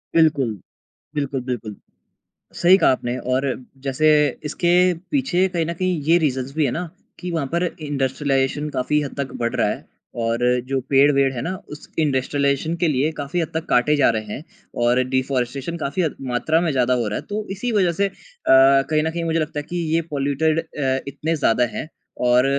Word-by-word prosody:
बिल्कुल, 155 Hz, -7 st, +4 dB, 0.7 s
बिल्कुल, 140 Hz, -2 st, -2 dB
बिल्कुल। 110 Hz, -4 st, -4 dB, 0.8 s
सही 180 Hz, +2 st, +7 dB
कहा -, -, +4 dB
आपने 125 Hz, -1 st, -2 dB, 0.2 s
और 130 Hz, +2 st, +1 dB, 0.4 s
जैसे 140 Hz, +3 st, +2 dB, 0.4 s
इसके 170 Hz, +3 st, 0 dB, 0.4 s
पीछे 225 Hz, -10 st, +2 dB
कहीं 170 Hz, -3 st, -1 dB
न 170 Hz, -, -2 dB
कहीं 180 Hz, -1 st, -1 dB
ये 165 Hz, +4 st, +4 dB
रीज़न्स 135 Hz, -4 st, -1 dB
भी 155 Hz, -, +2 dB
है 135 Hz, -, +1 dB
ना 175 Hz, +1 st, -3 dB, 0.3 s
कि 180 Hz, -, -5 dB
वहाँ 160 Hz, -5 st, -1 dB
पर 170 Hz, +1 st, +1 dB, 0.2 s
इंडस्ट्रियलाइज़ेशन 140 Hz, 0 st, -1 dB
काफ़ी 150 Hz, +4 st, +1 dB
हद 140 Hz, -, -6 dB
तक 135 Hz, -2 st, -3 dB
बढ़ 115 Hz, -, -1 dB
रहा -, -, +2 dB
है -, -, -4 dB, 0.4 s
और 115 Hz, +1 st, 0 dB, 0.3 s
जो 135 Hz, -1 st, 0 dB
पेड़-वेड़ 140 Hz, -1 st, +4 dB
हैं 120 Hz, -, -3 dB
ना 185 Hz, -, -2 dB, 0.2 s
उस -, -, -14 dB
इंडस्ट्रियलाइज़ेशन 140 Hz, +1 st, +1 dB
के 175 Hz, -, +3 dB
लिए 145 Hz, +1 st, +1 dB
काफ़ी 145 Hz, +5 st, -2 dB
हद 160 Hz, -, -2 dB
तक 160 Hz, +1 st, -2 dB
काटे 150 Hz, +5 st, +3 dB
जा 145 Hz, -, +4 dB
रहे 110 Hz, -1 st, -4 dB
हैं 150 Hz, -, -8 dB, 0.4 s
और 120 Hz, +2 st, +3 dB
डिफॉरेस्टेशन 130 Hz, +4 st, -1 dB
काफ़ी 145 Hz, +6 st, 0 dB, 0.3 s
मात्रा 155 Hz, +7 st, +1 dB
में 170 Hz, -2 st, 0 dB
ज़्यादा 125 Hz, -1 st, +2 dB
हो 110 Hz, -, -2 dB
रहा 105 Hz, -, -2 dB
है। -, -, -9 dB
तो 210 Hz, +1 st, -3 dB
इसी 210 Hz, +5 st, -3 dB
वज़ह 190 Hz, -5 st, +3 dB
से 200 Hz, +4 st, +1 dB
अ, -, -, -4 dB, 0.4 s
कहीं 135 Hz, +3 st, +5 dB
न 160 Hz, -, 0 dB
कहीं 170 Hz, +1 st, -3 dB
मुझे 165 Hz, 0 st, 0 dB
लगता 155 Hz, -1 st, -3 dB
है -, -, -5 dB
कि 175 Hz, -, -4 dB, 0.2 s
ये 165 Hz, -, +3 dB
पॉल्यूटेड 145 Hz, +3 st, +1 dB
अ, 135 Hz, -5 st, -2 dB
इतने 150 Hz, +4 st, -2 dB
ज़्यादा 125 Hz, -4 st, +2 dB
हैं -, -, -4 dB, 0.4 s
और 125 Hz, +1 st, +5 dB
145 Hz, 190 wpm, -21 LUFS, 130-165 Hz, 0.8 s, सही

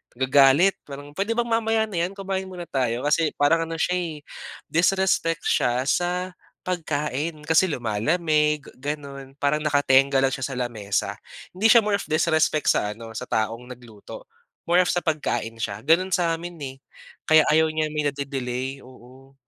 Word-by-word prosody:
nagagalit. 135 Hz, +8 st, +4 dB
Parang, 145 Hz, 0 st, -9 dB
"Puwede 200 Hz, +8 st, -2 dB
bang 240 Hz, 0 st, 0 dB
mamaya 225 Hz, -1 st, +2 dB
na 210 Hz, -6 st, -3 dB
'yan? 195 Hz, -, -12 dB
Kumain 195 Hz, -1 st, -4 dB
muna 180 Hz, -2 st, -7 dB
tayo." 125 Hz, -3 st, -1 dB
Kasi 150 Hz, +2 st, +1 dB
parang 165 Hz, +3 st, +2 dB
ano 165 Hz, -, -5 dB
siya 180 Hz, +2 st, 0 dB
eh, 160 Hz, -4 st, -6 dB, 0.5 s
disrespect 170 Hz, -1 st, +1 dB
siya 125 Hz, +1 st, +1 dB
sa 180 Hz, +3 st, 0 dB, 0.3 s
pagkain, 155 Hz, -3 st, -3 dB
kasi 160 Hz, +4 st, +3 dB
lumalamig, 150 Hz, -, 0 dB, 0.2 s
gano'n. 140 Hz, -1 st, -6 dB
Parang 145 Hz, +1 st, 0 dB
nakatengga 140 Hz, -2 st, +3 dB
lang 135 Hz, -, +2 dB
siya 135 Hz, -2 st, -3 dB
sa 135 Hz, -, -6 dB
lamesa. 105 Hz, -5 st, -2 dB, 0.3 s
Hindi 195 Hz, +5 st, +2 dB
siya 230 Hz, +1 st, +7 dB
more 205 Hz, -1 st, +1 dB
of -, -, -7 dB
disrespect 155 Hz, -1 st, +2 dB
sa 105 Hz, 0 st, 0 dB
ano, 115 Hz, 0 st, -10 dB
sa 125 Hz, -, -5 dB
taong 115 Hz, +2 st, -2 dB
nagluto, 120 Hz, -, -12 dB, 0.4 s
more 175 Hz, -, +4 dB
of -, -, +1 dB
sa 175 Hz, -, 0 dB
pagkain 150 Hz, -8 st, -2 dB
siya. 105 Hz, -2 st, -4 dB
Gano'n 170 Hz, +8 st, +2 dB
sa 165 Hz, -2 st, +1 dB
amin 175 Hz, +1 st, -8 dB
eh, 135 Hz, -1 st, -6 dB, 0.5 s
kaya 155 Hz, 0 st, +6 dB
ayaw 160 Hz, +1 st, +4 dB
niya 155 Hz, 0 st, -1 dB
may 150 Hz, 0 st, -2 dB
nade-delay. 135 Hz, -1 st, -4 dB
Oo. 130 Hz, +1 st, -17 dB
150 Hz, 165 wpm, -24 LUFS, 130-175 Hz, 0.5 s, siya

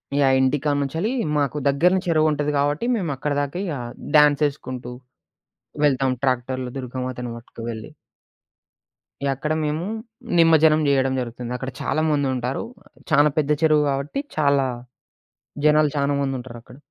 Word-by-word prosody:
Yeah! 135 Hz, -2 st, +4 dB
ఇంటికాడనుంచెల్లీ 145 Hz, -, 0 dB, 0.3 s
మాకు 145 Hz, 0 st, 0 dB
దగ్గరనే 180 Hz, +7 st, +3 dB
చెరువుంటది 155 Hz, -2 st, +2 dB
కాబట్టి 145 Hz, +7 st, 0 dB
మేమక్కడి 150 Hz, -, -2 dB
దాకా 145 Hz, +4 st, -4 dB
ఇగ 170 Hz, -, -3 dB, 0.4 s
డ్యాన్సేసుకుంటూ, 145 Hz, -4 st, +2 dB, 0.9 s
వెళ్తాం 135 Hz, -2 st, +2 dB
ట్రాక్టర్‌లో 130 Hz, -1 st, -1 dB
దుర్గామాతను 125 Hz, -1 st, -5 dB
పట్టుకు 115 Hz, 0 st, -12 dB
వెళ్లి. 110 Hz, -1 st, -7 dB, 1.4 s
యక్కడ 140 Hz, +3 st, -1 dB
మేము 155 Hz, +3 st, -2 dB, 0.5 s
నిమజ్జనం 160 Hz, -1 st, +5 dB
జేయడం 135 Hz, -1 st, +2 dB
జరుగుతుంది. 120 Hz, 0 st, -5 dB
అక్కడ 130 Hz, +1 st, -5 dB
చాలా 155 Hz, -, 0 dB
మందుంటారు. 130 Hz, -3 st, -1 dB, 0.2 s
ఆహ్, -, -, -24 dB, 0.2 s
చానా 150 Hz, 0 st, +5 dB
పెద్ద 150 Hz, -1 st, +1 dB
చెరువు 155 Hz, -1 st, +4 dB
కాబట్టి 140 Hz, -, -3 dB, 0.2 s
చాలా 140 Hz, -3 st, +3 dB, 1.0 s
జనాలు 150 Hz, 0 st, +4 dB
చానా 140 Hz, 0 st, +1 dB
మందుంటారక్కడ. 125 Hz, -3 st, -6 dB
140 Hz, 115 wpm, -22 LUFS, 130-150 Hz, 1.4 s, నిమజ్జనం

